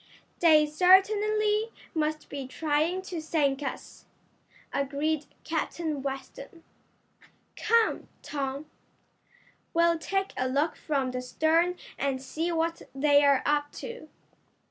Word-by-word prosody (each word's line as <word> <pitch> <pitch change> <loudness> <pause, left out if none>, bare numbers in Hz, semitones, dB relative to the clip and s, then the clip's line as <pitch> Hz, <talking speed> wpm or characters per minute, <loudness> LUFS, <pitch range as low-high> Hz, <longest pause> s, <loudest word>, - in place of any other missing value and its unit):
"They 310 -3 +6
certainly 420 +6 +3 0.2
must 310 -1 -1
be 275 -2 -6
trying 315 +6 0
to 355 -4 -5
sink 295 -3 0
us," 275 - -7 0.7
agreed 285 +2 -1 0.2
Captain 320 -2 -2
Weston. 275 - -7 0.9
"Come, 455 0 +2 0.2
Tom, 280 0 -4 1.1
we'll 335 0 +3
take 390 +3 -2
a 255 0 -1
look 285 +5 +1
from 275 -4 -1
the 250 0 -3
stern 325 +7 +1 0.2
and 275 -1 0
see 315 +6 -3
what 330 0 -1
they're 285 -1 +4
up 290 0 +1
to." 480 0 -8
310 Hz, 105 wpm, -28 LUFS, 280-345 Hz, 1.1 s, They